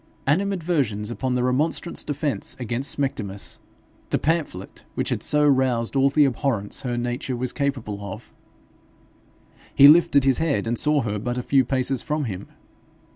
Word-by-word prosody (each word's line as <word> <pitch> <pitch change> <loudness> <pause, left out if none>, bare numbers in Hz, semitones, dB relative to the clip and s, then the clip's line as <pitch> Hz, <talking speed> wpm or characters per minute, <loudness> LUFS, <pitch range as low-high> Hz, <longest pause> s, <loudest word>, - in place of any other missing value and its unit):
Animadversions 150 - 0
upon 125 +1 -2
the 125 - 0
Remonstrants 145 +7 0
Defence 145 -1 -3
against 125 +3 -1
Smectymnus, 105 -8 -2 0.5
the - - +1
pamphlet 150 - -3
which - - -1
had - - -2
so 150 0 +2
roused 130 -3 +1
all 135 0 +4
the 145 +1 +4
abhorrence 120 -6 -1
her 125 -3 -3
nature 120 +2 -3
was 125 +1 -3
capable 130 -8 -2
of 100 -1 -9 1.4
he 140 - +9
lifted 150 -3 +6
his 135 -2 +3
head 160 -6 0
and 115 +1 -1
saw 150 -3 +2
her 105 -2 -2
but 120 +3 -3
a 125 - -2
few 135 +1 +3
paces 130 0 0
from 150 -1 -2
him. 100 -5 -5
130 Hz, 155 wpm, -23 LUFS, 120-145 Hz, 1.4 s, he